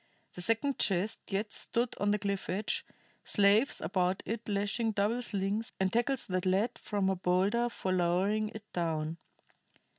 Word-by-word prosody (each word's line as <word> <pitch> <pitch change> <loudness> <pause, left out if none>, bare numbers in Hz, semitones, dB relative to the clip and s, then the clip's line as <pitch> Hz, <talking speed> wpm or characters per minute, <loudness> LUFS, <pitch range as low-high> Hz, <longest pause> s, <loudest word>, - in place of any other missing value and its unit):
The 180 - -5
second 230 +8 +1
chest 200 +3 +1
yet 205 +1 -2
stood 240 +1 -1
on 205 - +1
the 210 - +3
cliff 200 -1 -3
edge, 195 +5 -1 0.4
slaves 205 +5 +4
about 185 -1 0
it 225 0 -4
lashing 205 +3 0
double 210 +4 +1
slings 205 0 -1
and 190 -1 +1
tackles 240 +3 +1
that 185 0 -1
led 200 +6 +1
from 205 -3 -1
a 190 - +2
boulder 195 +7 +1
for 190 -5 -3
lowering 185 +4 +1
it 220 -1 -9
down. 165 -1 -2
200 Hz, 155 wpm, -31 LUFS, 185-225 Hz, 0.4 s, slaves